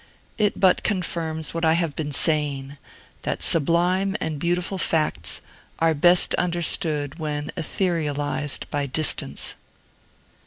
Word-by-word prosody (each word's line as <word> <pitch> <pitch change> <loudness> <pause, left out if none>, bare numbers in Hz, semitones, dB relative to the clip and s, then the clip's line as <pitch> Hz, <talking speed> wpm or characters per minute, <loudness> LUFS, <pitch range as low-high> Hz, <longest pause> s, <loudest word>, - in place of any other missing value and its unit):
It 210 -1 +1
but 185 -2 +4
confirms 165 -5 -2
what 165 0 -4
I 160 0 +4
have 165 -3 -1
been 150 -1 -4
saying, 145 -2 +1 0.4
that - - -3
sublime 180 +5 +3
and 155 -2 -3
beautiful 175 +3 -1
facts 160 -3 0 0.4
are 165 0 +2
best 175 +4 +5
understood 165 -3 -1
when 150 -1 -4
etherealized 150 -6 -1
by 145 -1 -1
distance. 150 +4 -1
160 Hz, 115 wpm, -23 LUFS, 145-175 Hz, 0.4 s, best